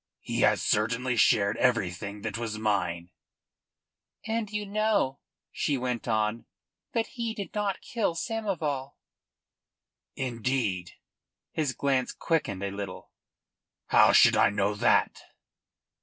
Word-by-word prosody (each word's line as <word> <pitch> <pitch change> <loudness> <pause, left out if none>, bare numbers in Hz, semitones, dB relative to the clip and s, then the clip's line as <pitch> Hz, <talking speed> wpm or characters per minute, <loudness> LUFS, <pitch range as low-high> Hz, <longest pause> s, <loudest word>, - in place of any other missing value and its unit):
"He - - -3
has - - +3
certainly 115 +4 +1
shared 105 -2 +3
everything 100 -3 0
that 110 -2 -3
was 115 -2 -3
mine." 90 -5 -1 1.1
"And 225 -1 -2
you 210 -1 -2
know," 205 -9 +1 0.3
she 145 - 0
went 125 -2 -3
on, 110 0 0 0.5
"that 230 -1 +1
he 230 -2 -4
did 200 -3 -6
not 205 -2 -1
kill 230 -10 -1
Samoval." 165 - -3 1.2
"Indeed?" 115 -8 -2 0.6
His 150 -4 -1
glance 135 -2 0
quickened 100 - -1
a 100 - -2
little. 95 -2 -7 0.8
"How - - +6
should - - +7
I - - +5
know 100 0 0
that?" 105 - +2
125 Hz, 115 wpm, -28 LUFS, -, 1.2 s, should